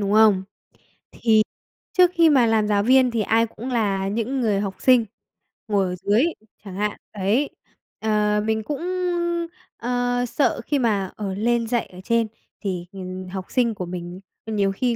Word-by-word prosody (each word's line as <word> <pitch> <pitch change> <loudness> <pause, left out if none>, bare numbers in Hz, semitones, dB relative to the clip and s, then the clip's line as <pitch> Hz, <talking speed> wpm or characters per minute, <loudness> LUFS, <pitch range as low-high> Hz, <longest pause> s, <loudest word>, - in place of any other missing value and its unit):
đúng 200 0 0
không? 215 -3 +5 0.3
Thì - - -30 1.1
trước 360 -1 +5
khi 335 -2 +5
mà 255 -5 +5
làm 220 -1 +2
giáo 200 -1 +2
viên 255 +2 +5
thì 230 -2 0
ai 225 +2 +2
cũng 230 +3 -8
là 200 -5 0
những 235 +5 -1
người 210 -4 +1
học 195 -2 -3
sinh 250 -3 +5 0.6
ngồi 200 -2 +2
ở 180 0 -3
dưới 205 - +2 0.4
chẳng 195 -3 -8
hạn, 210 +1 -1 0.2
đấy, 210 +8 +1 0.5
ờ, 210 -1 +1
mình 220 0 0
cũng, 290 +5 -4 1.0
ờ, 245 0 0
sợ 275 +4 0
khi 290 -2 +1
mà, 205 -6 0
ờ, 200 -3 -4
lên 230 +3 +1
dạy 240 0 0
ở 185 0 -13
trên 230 0 +1 0.3
thì, 185 -4 -3
ừm, 185 -1 -7
học 190 0 -5
sinh 240 -3 +1
của 185 - -4
mình 175 +1 -6 0.3
nhiều 205 -3 0
khi 240 +4 0
215 Hz, 175 wpm, -23 LUFS, 195-240 Hz, 1.1 s, không